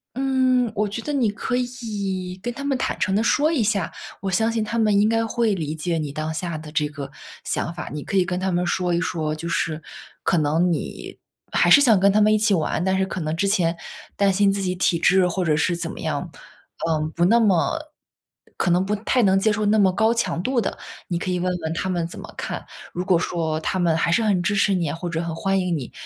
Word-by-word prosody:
嗯， 260 Hz, -2 st, +2 dB
我 210 Hz, 0 st, 0 dB
觉 215 Hz, +3 st, -4 dB
得 295 Hz, -, -4 dB
你 255 Hz, -6 st, +2 dB
可 225 Hz, +4 st, -3 dB
以， 205 Hz, -7 st, -3 dB
跟 240 Hz, -, -3 dB
他 280 Hz, +3 st, -6 dB
们 275 Hz, -2 st, +1 dB
坦 -, -, -2 dB
诚 190 Hz, 0 st, +1 dB
地 215 Hz, -, +2 dB
说 295 Hz, +6 st, +3 dB
一 300 Hz, -9 st, +1 dB
下， 205 Hz, -3 st, 0 dB, 0.3 s
我 195 Hz, -, -3 dB
相 220 Hz, +5 st, +2 dB
信 225 Hz, -1 st, -1 dB
他 215 Hz, +2 st, -2 dB
们 215 Hz, -3 st, +3 dB
应 210 Hz, -, +4 dB
该 225 Hz, 0 st, +1 dB
会 225 Hz, -1 st, +1 dB
理 155 Hz, -4 st, -3 dB
解 165 Hz, +2 st, -2 dB
你 150 Hz, -3 st, -3 dB
当 155 Hz, +2 st, -3 dB
下 170 Hz, 0 st, -3 dB
的 155 Hz, 0 st, -9 dB
这 150 Hz, -2 st, +1 dB
个 145 Hz, -2 st, -7 dB, 0.4 s
想 170 Hz, -, -2 dB
法。 175 Hz, -, -6 dB
你 150 Hz, -1 st, -5 dB
可 195 Hz, -, -2 dB
以 185 Hz, -, +3 dB
跟 180 Hz, 0 st, -2 dB
他 190 Hz, +1 st, -1 dB
们 175 Hz, 0 st, 0 dB
说 180 Hz, 0 st, 0 dB
一 170 Hz, -, +2 dB
说， 160 Hz, -4 st, -2 dB
就 155 Hz, +2 st, -5 dB
是 160 Hz, -2 st, -1 dB, 0.4 s
可 175 Hz, -, +2 dB
能 160 Hz, +4 st, +2 dB
你 -, -, -6 dB, 0.4 s
还 -, -, +3 dB
是 -, -, +10 dB
想 240 Hz, -7 st, +5 dB
跟 200 Hz, +1 st, +4 dB
他 210 Hz, -, +3 dB
们 215 Hz, 0 st, +5 dB
一 215 Hz, -, +4 dB
起 215 Hz, -1 st, +3 dB
玩， 165 Hz, -1 st, 0 dB
但 190 Hz, +1 st, +1 dB
是 190 Hz, -, +1 dB
可 190 Hz, -1 st, -5 dB
能 155 Hz, 0 st, -2 dB
之 200 Hz, -, +1 dB
前 175 Hz, -4 st, +1 dB, 0.4 s
担 200 Hz, -1 st, +3 dB
心 200 Hz, +1 st, +3 dB
自 195 Hz, 0 st, -2 dB
己 185 Hz, -1 st, -1 dB
体 175 Hz, -2 st, +1 dB
质， 190 Hz, 0 st, +4 dB
或 180 Hz, +1 st, -1 dB
者 155 Hz, -2 st, +2 dB
是 170 Hz, +3 st, +1 dB
怎 -, -, -2 dB
么 -, -, -8 dB
样， -, -, -3 dB, 0.6 s
嗯， 155 Hz, -1 st, 0 dB
不 170 Hz, -, -1 dB
那 225 Hz, +7 st, +5 dB
么 205 Hz, -, +2 dB, 0.8 s
可 -, -, +1 dB
能 180 Hz, +2 st, +3 dB
不 210 Hz, +2 st, 0 dB
太 230 Hz, +4 st, +1 dB
能 195 Hz, -1 st, +4 dB
接 215 Hz, +3 st, +2 dB
受 210 Hz, 0 st, -1 dB
那 210 Hz, +1 st, +3 dB
么 190 Hz, -2 st, +5 dB
高 220 Hz, +5 st, +2 dB
强 185 Hz, -7 st, -1 dB
度 255 Hz, +1 st, +1 dB
的， -, -, -3 dB, 0.3 s
你 175 Hz, -, -1 dB
可 185 Hz, +2 st, -3 dB
以 180 Hz, -, 0 dB
问 180 Hz, +1 st, 0 dB
问 160 Hz, 0 st, -2 dB
他 190 Hz, +3 st, -2 dB
们 175 Hz, -2 st, -1 dB
怎 -, -, -9 dB
么 -, -, -9 dB
看。 -, -, -4 dB, 0.3 s
如 180 Hz, -, -2 dB
果 185 Hz, -2 st, +3 dB
说 165 Hz, -2 st, -1 dB
他 185 Hz, -, -1 dB
们 170 Hz, -3 st, +2 dB
还 165 Hz, -, +1 dB
是 230 Hz, -, +3 dB
很 205 Hz, -5 st, +2 dB
支 205 Hz, +4 st, +1 dB
持 200 Hz, 0 st, +3 dB
你， 170 Hz, -5 st, -1 dB
或 170 Hz, +3 st, -5 dB
者 165 Hz, -1 st, -2 dB
很 165 Hz, -1 st, -4 dB
欢 195 Hz, +3 st, 0 dB
迎 180 Hz, -2 st, 0 dB
你， 135 Hz, -6 st, -5 dB
190 Hz, 275 characters per minute, -23 LUFS, 170-215 Hz, 0.8 s, 是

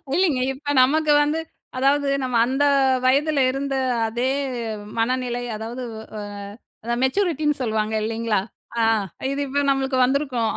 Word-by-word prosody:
இல்லைங்க. 335 Hz, -8 st, +2 dB
இப்ப 290 Hz, +2 st, -3 dB
நமக்கு 305 Hz, +3 st, +3 dB
வந்து 305 Hz, +2 st, 0 dB, 0.4 s
அதாவது 280 Hz, +2 st, +2 dB
நம்ம 250 Hz, -2 st, -2 dB
அந்த 270 Hz, +3 st, +1 dB, 0.4 s
வயதில 285 Hz, +3 st, +3 dB
இருந்த 275 Hz, 0 st, -3 dB, 0.3 s
அதே 240 Hz, +3 st, -1 dB, 0.7 s
மனநிலை 245 Hz, 0 st, -1 dB
அதாவது 230 Hz, +4 st, -6 dB, 0.3 s
அ -, -, -4 dB, 0.6 s
அதான் 235 Hz, +2 st, -2 dB
மெச்சூரிட்டின்னு 300 Hz, -2 st, +1 dB
சொல்லுவாங்க 220 Hz, -2 st, -1 dB
இல்லைங்களா? 225 Hz, -1 st, 0 dB, 0.4 s
அ, -, -, +3 dB, 0.5 s
இது 275 Hz, -, -3 dB
இப்போ 285 Hz, +2 st, 0 dB
நம்மளுக்கு 270 Hz, -1 st, +1 dB
வந்துருக்கும். 260 Hz, -4 st, 0 dB
265 Hz, 125 wpm, -22 LUFS, 240-290 Hz, 0.7 s, நமக்கு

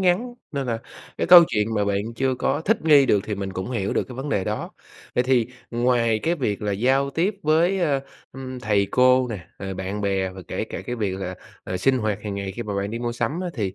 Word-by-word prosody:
ngắn 190 Hz, +7 st, +1 dB, 0.2 s
nên 140 Hz, -2 st, -2 dB
là 115 Hz, -2 st, -1 dB, 0.4 s
cái -, -, 0 dB
câu 175 Hz, -1 st, +10 dB
chuyện 105 Hz, +1 st, 0 dB
mà 105 Hz, -1 st, +1 dB
bạn 100 Hz, +3 st, -2 dB
chưa 130 Hz, -1 st, +1 dB
có 135 Hz, +4 st, 0 dB
thích 220 Hz, +3 st, +1 dB
nghi 145 Hz, -4 st, +6 dB
được 100 Hz, -, +3 dB
thì 105 Hz, -, -3 dB
mình 95 Hz, -1 st, -4 dB
cũng 95 Hz, +7 st, -4 dB
hiểu 100 Hz, -5 st, -1 dB
được -, -, 0 dB
cái 125 Hz, -, -8 dB
vấn 135 Hz, +3 st, -4 dB
đề 100 Hz, -9 st, 0 dB
đó. -, -, -3 dB, 0.4 s
Vậy 125 Hz, -, +2 dB
thì 125 Hz, -3 st, +3 dB, 0.2 s
ngoài 120 Hz, -2 st, +2 dB
cái 170 Hz, +2 st, +1 dB
việc 105 Hz, -, -2 dB
là 105 Hz, -, 0 dB
giao 135 Hz, +7 st, +2 dB
tiếp 185 Hz, +8 st, 0 dB
với, 165 Hz, +5 st, +3 dB
ơ, 145 Hz, -5 st, +1 dB, 0.3 s
ưm, 130 Hz, -1 st, -7 dB
thầy 100 Hz, -3 st, +2 dB
cô 125 Hz, 0 st, +4 dB
nè, 100 Hz, -6 st, -6 dB
à, 95 Hz, 0 st, -5 dB
bạn 95 Hz, +2 st, -4 dB
bè 95 Hz, -2 st, 0 dB
và 95 Hz, 0 st, -10 dB
kể -, -, -2 dB
cả -, -, -6 dB
cái 120 Hz, -, -3 dB
việc 100 Hz, -4 st, -1 dB
là, 95 Hz, 0 st, -4 dB, 0.3 s
à, 95 Hz, -, -3 dB
sinh 130 Hz, +5 st, +2 dB
hoạt 105 Hz, -3 st, -1 dB
hàng 105 Hz, -2 st, -4 dB
ngày 100 Hz, -1 st, -4 dB
khi 120 Hz, -, -5 dB
mà 105 Hz, -2 st, -4 dB
bạn 100 Hz, +1 st, -2 dB
đi 115 Hz, -, -4 dB
mua 120 Hz, 0 st, -2 dB
sắm 150 Hz, +8 st, -2 dB
á 180 Hz, -, -2 dB
thì, 100 Hz, -6 st, -2 dB
120 Hz, 255 wpm, -23 LUFS, 100-135 Hz, 0.4 s, câu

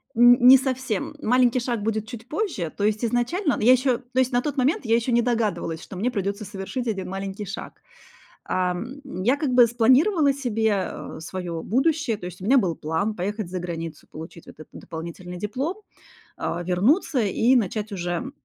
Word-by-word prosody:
Н 245 Hz, +1 st, +7 dB
не 265 Hz, +1 st, +11 dB
совсем. 260 Hz, -5 st, -3 dB
Маленький 250 Hz, +1 st, +3 dB
шаг 235 Hz, -3 st, -2 dB
будет 220 Hz, 0 st, -2 dB
чуть 235 Hz, 0 st, -9 dB
позже, 310 Hz, -, -2 dB
то 205 Hz, -, -3 dB
есть 215 Hz, +2 st, +1 dB
изначально 245 Hz, -, 0 dB
Ну, -, -, -5 dB
я 250 Hz, -, +7 dB
еще 255 Hz, -1 st, +2 dB
то 255 Hz, 0 st, -4 dB
есть 260 Hz, 0 st, +2 dB
на 245 Hz, 0 st, +2 dB
тот 290 Hz, 0 st, -4 dB
момент 265 Hz, +1 st, +1 dB
я 225 Hz, +1 st, +3 dB
еще 235 Hz, +2 st, 0 dB
не 235 Hz, 0 st, +4 dB
догадывалась, 220 Hz, -9 st, -1 dB
что 190 Hz, -, -10 dB
мне 235 Hz, +6 st, 0 dB
придется 200 Hz, 0 st, -3 dB
совершить 205 Hz, +6 st, -5 dB
1 195 Hz, -4 st, -3 dB
маленький 195 Hz, +1 st, -5 dB
шаг. 195 Hz, +3 st, -7 dB, 0.7 s
Ам, 185 Hz, +10 st, -2 dB, 0.2 s
я 255 Hz, +5 st, +3 dB
как 285 Hz, -3 st, -1 dB
бы 245 Hz, -2 st, +7 dB
спланировала 275 Hz, -, +4 dB
себе, 225 Hz, -5 st, 0 dB
а, 190 Hz, -4 st, -4 dB
свое 170 Hz, -1 st, -5 dB
будущее. 270 Hz, -, +1 dB
То 180 Hz, -, -8 dB
есть 180 Hz, 0 st, -9 dB
у -, -, -8 dB
меня 265 Hz, +5 st, +5 dB
был 180 Hz, -7 st, 0 dB
план 195 Hz, +8 st, -2 dB
поехать 205 Hz, +1 st, -3 dB
за 185 Hz, -, -3 dB
границу, 165 Hz, -2 st, -6 dB
получить 160 Hz, +2 st, -10 dB
вот -, -, -14 dB
этот -, -, -11 dB
дополнительный 170 Hz, +2 st, -8 dB
диплом, 265 Hz, -, -3 dB, 0.6 s
а, 175 Hz, +1 st, -3 dB
вернуться, 240 Hz, -, +2 dB
и 225 Hz, +4 st, +3 dB
начать 210 Hz, -1 st, 0 dB
уже 180 Hz, +8 st, -3 dB
225 Hz, 190 wpm, -24 LUFS, 190-255 Hz, 0.7 s, не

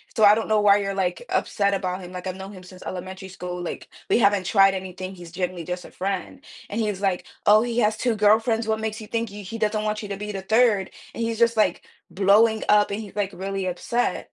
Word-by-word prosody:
So 220 Hz, -, +2 dB
I 205 Hz, -, +8 dB
don't 225 Hz, -, -2 dB
know 215 Hz, -1 st, +3 dB
why 205 Hz, -1 st, +6 dB
you're, 195 Hz, -1 st, -2 dB
like, 190 Hz, -, -1 dB
upset 200 Hz, -1 st, +1 dB
about 185 Hz, -1 st, -3 dB
him. 180 Hz, -, -9 dB
Like, 180 Hz, 0 st, -7 dB
I've 185 Hz, -, -3 dB
known 190 Hz, +1 st, -8 dB
him 185 Hz, -1 st, -11 dB
since 185 Hz, 0 st, -13 dB
elementary 190 Hz, +1 st, -7 dB
school, 180 Hz, -1 st, -6 dB
like, 175 Hz, -, -6 dB, 0.2 s
we -, -, +4 dB
haven't 200 Hz, -4 st, +3 dB
tried 195 Hz, -1 st, +5 dB
anything, 185 Hz, 0 st, -6 dB
he's 175 Hz, -2 st, -11 dB
generally 180 Hz, -1 st, -3 dB
just 180 Hz, +1 st, -5 dB
a -, -, -12 dB
friend." 190 Hz, -2 st, -4 dB, 0.3 s
And 220 Hz, +2 st, -1 dB
he's 210 Hz, -3 st, -1 dB
like, 190 Hz, -2 st, 0 dB, 0.2 s
"Oh, 210 Hz, +1 st, +7 dB
he 235 Hz, 0 st, -2 dB
has 215 Hz, -1 st, +2 dB
2 235 Hz, -1 st, 0 dB
girlfriends. 220 Hz, +2 st, +3 dB
What 220 Hz, 0 st, 0 dB
makes 220 Hz, 0 st, -3 dB
you -, -, -8 dB
think 230 Hz, -1 st, -2 dB
he 205 Hz, 0 st, -9 dB
he 225 Hz, +5 st, -6 dB
doesn't 215 Hz, 0 st, 0 dB
want 210 Hz, 0 st, -1 dB
you 205 Hz, -, -7 dB
to 200 Hz, -, -4 dB
be 210 Hz, 0 st, -5 dB
the 195 Hz, -1 st, -5 dB
3rd?" 220 Hz, -1 st, +3 dB, 0.2 s
And 230 Hz, -, -3 dB
he's 230 Hz, -1 st, -2 dB
just, 235 Hz, 0 st, +4 dB
like, 185 Hz, -5 st, +2 dB, 0.3 s
blowing 215 Hz, +3 st, +4 dB
up, 210 Hz, 0 st, +5 dB
and 210 Hz, +2 st, -3 dB
he's, 205 Hz, -2 st, -11 dB
like, 205 Hz, -2 st, 0 dB
really 195 Hz, +1 st, -3 dB
upset. 235 Hz, +7 st, -1 dB
200 Hz, 245 wpm, -24 LUFS, 185-215 Hz, 0.3 s, I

